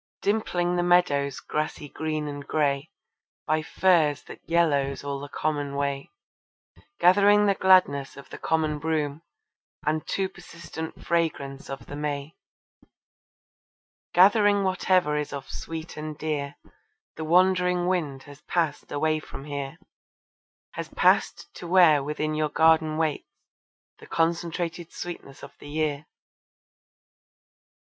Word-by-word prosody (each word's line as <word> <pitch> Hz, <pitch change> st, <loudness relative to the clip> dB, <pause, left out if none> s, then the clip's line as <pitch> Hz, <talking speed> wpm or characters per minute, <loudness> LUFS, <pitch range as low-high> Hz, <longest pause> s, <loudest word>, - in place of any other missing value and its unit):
Dimpling 180 Hz, -4 st, 0 dB
the -, -, +2 dB
meadow's 145 Hz, -6 st, +2 dB
grassy 150 Hz, -1 st, -3 dB
green 155 Hz, 0 st, -3 dB
and 145 Hz, -1 st, -7 dB
grey, 145 Hz, -1 st, 0 dB, 0.6 s
By 155 Hz, 0 st, +1 dB
furze 160 Hz, -4 st, +2 dB
that -, -, -11 dB
yellows 145 Hz, -6 st, +1 dB
all 140 Hz, -1 st, -3 dB
the 145 Hz, +1 st, -8 dB
common 145 Hz, -2 st, -2 dB
way, 140 Hz, -1 st, -2 dB, 0.9 s
Gathering 205 Hz, +3 st, +5 dB
the 200 Hz, -, +4 dB
gladness 180 Hz, -9 st, +3 dB
of 140 Hz, -, -11 dB
the -, -, -8 dB
common 155 Hz, -2 st, 0 dB
broom, 155 Hz, -1 st, -1 dB, 0.6 s
And 155 Hz, +1 st, -1 dB
too 195 Hz, -1 st, 0 dB
persistent 165 Hz, -3 st, -9 dB
fragrance 150 Hz, -5 st, -1 dB
of 135 Hz, 0 st, -7 dB
the 145 Hz, -, -8 dB
may 145 Hz, 0 st, -4 dB, 1.8 s
Gathering 205 Hz, +2 st, +5 dB
whatever 185 Hz, -4 st, +2 dB
is 150 Hz, -1 st, -3 dB
of 140 Hz, -2 st, -6 dB
sweet 165 Hz, 0 st, -7 dB
and 155 Hz, 0 st, -6 dB
dear, 145 Hz, -2 st, -3 dB, 0.6 s
The 160 Hz, -, -5 dB
wandering 180 Hz, +1 st, +3 dB
wind 155 Hz, -7 st, -1 dB
has 145 Hz, 0 st, -14 dB
passed 160 Hz, -4 st, -1 dB
away 155 Hz, +2 st, +1 dB
from 140 Hz, -2 st, -10 dB
here, 140 Hz, -2 st, -5 dB, 0.9 s
Has -, -, -6 dB
passed -, -, +2 dB
to 175 Hz, -, -8 dB
where 170 Hz, -5 st, +5 dB
within 150 Hz, +1 st, -2 dB
your 155 Hz, 0 st, 0 dB
garden 160 Hz, 0 st, +3 dB
waits 160 Hz, -2 st, -1 dB, 0.7 s
The -, -, -14 dB
concentrated 170 Hz, 0 st, -1 dB
sweetness 170 Hz, -6 st, -8 dB
of -, -, -9 dB
the 145 Hz, -, -11 dB
year. 150 Hz, -1 st, -2 dB
155 Hz, 125 wpm, -26 LUFS, 145-175 Hz, 1.8 s, Gathering